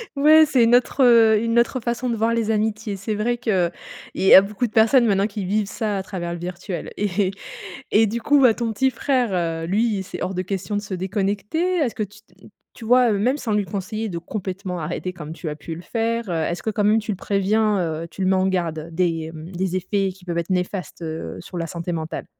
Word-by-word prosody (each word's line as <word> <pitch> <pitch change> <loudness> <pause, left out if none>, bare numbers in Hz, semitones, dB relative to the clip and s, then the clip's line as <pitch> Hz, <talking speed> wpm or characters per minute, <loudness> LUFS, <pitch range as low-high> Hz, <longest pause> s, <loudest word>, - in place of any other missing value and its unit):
Ouais, 310 +3 +7
c'est 265 -5 +3
une 230 +1 +5
autre, 255 +2 +2
heu, 225 -3 +6
une 230 +1 +2
autre 240 +2 +1
façon 240 +1 -2
de 235 - 0
voir 225 +1 +1
les 225 -1 0
amitiés. 215 -1 -1
C'est 210 +3 -3
vrai 235 +3 0
qu'il 190 -8 +1 0.4
y 190 - +5
a 190 - +11
beaucoup 210 +4 -2
de - - -14
personnes 230 +3 +5
maintenant 200 -1 +2
qui 205 -2 -5
vivent 205 +2 0
ça 210 0 -2
à 190 - -3
travers 175 -3 -5
le 170 - -6
virtuel. 175 0 -6
Et 195 -1 0 0.6
et 220 +1 +5
du 230 +3 -3
coup, 290 +3 +4
ouais, 245 -4 +6
ton 235 -2 -2
petit 265 +5 +2
frère, 255 0 0 0.3
heu, 165 - -4
lui, 205 0 +1
c'est 185 - -8
hors 190 - -2
de 185 - -1
question 195 +2 -4
de 205 - -2
se 195 - -7
déconnecter? 205 - -1
Est-ce 280 -9 0
que, 215 - -1
tu 210 +1 -11
t 190 0 -20 0.3
tu 230 - -10
vois, 245 0 +5
heu, 200 - 0
même 255 +7 +1
sans 230 -7 -2
lui 205 -1 +1
conseiller 210 +3 -4
de 170 - -4
complètement 185 0 -5
arrêter 175 +3 -4
comme 160 -3 -8
tu 170 0 -8
as 150 - -3
pu 160 +2 -7
le 170 - -9
faire, 230 +3 -2
heu, - - -1
est-ce 165 +1 -2
que 220 - -1
quand 210 0 -1
même 210 +2 +4
tu 220 0 -4
le - - -2
préviens, 205 +2 +1 0.3
heu, - - -7
tu 190 - -5
le - - +1
mets 190 - +3
en 190 0 +2
garde 170 -4 -2
des, 165 -2 -1
mmh, 160 +2 -9
des 185 0 -2
effets 195 +1 0
qui 185 0 -17
peuvent 170 -1 -2
être 170 - -4
néfastes, 180 -2 -3
heu, 160 0 -5
sur 180 - -8
la 165 - -3
santé 170 +1 -5
mentale? 160 -1 -4
205 Hz, 245 wpm, -22 LUFS, 180-225 Hz, 0.6 s, a